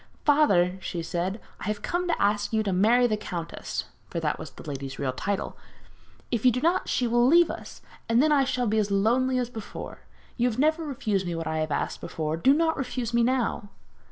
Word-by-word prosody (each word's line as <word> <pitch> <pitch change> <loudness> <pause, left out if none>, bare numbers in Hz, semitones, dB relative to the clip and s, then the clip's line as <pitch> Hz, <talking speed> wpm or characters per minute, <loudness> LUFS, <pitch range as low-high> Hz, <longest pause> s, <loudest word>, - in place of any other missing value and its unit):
'Father,' 190 -12 +4
she 170 -3 -4
said, 180 +5 -2 0.2
'I - - -7
have 210 0 -3
come 355 +1 -1
to 345 - 0
ask 205 0 +1
you 220 -1 +1
to 195 -3 -1
marry 225 +7 +4
the 220 -3 +2
countess' 170 -5 -5 0.3
(for - - -3
that - - -1
was - - -7
the - - -13
lady's 135 -2 -5
real 135 -2 -1
title) 200 +8 -3 0.8
'if 235 -4 -1
you 255 - +7
do 250 - -1
not 335 +6 +1
she 250 - +1
will 240 +1 +3
leave 340 +4 +5
us, - - -9 0.3
and 230 +1 +4
then 305 +3 +4
I 285 -2 +5
shall 255 -2 -1
be 220 0 +2
as 205 -1 0
lonely 240 +6 +2
as 245 -1 -1
before. 220 -3 -8 0.4
You 245 0 +2
have 225 - -5
never 310 +4 +2
refused 215 - -2
me 170 - -2
what 165 0 -4
I 160 0 -1
have 155 0 -1
asked - - -2
before, 155 -1 -3
do 165 +12 +4
not 320 +2 +2
refuse 250 -3 -3
me 235 - +3
now.' 240 -4 0
230 Hz, 220 wpm, -26 LUFS, 190-260 Hz, 0.8 s, you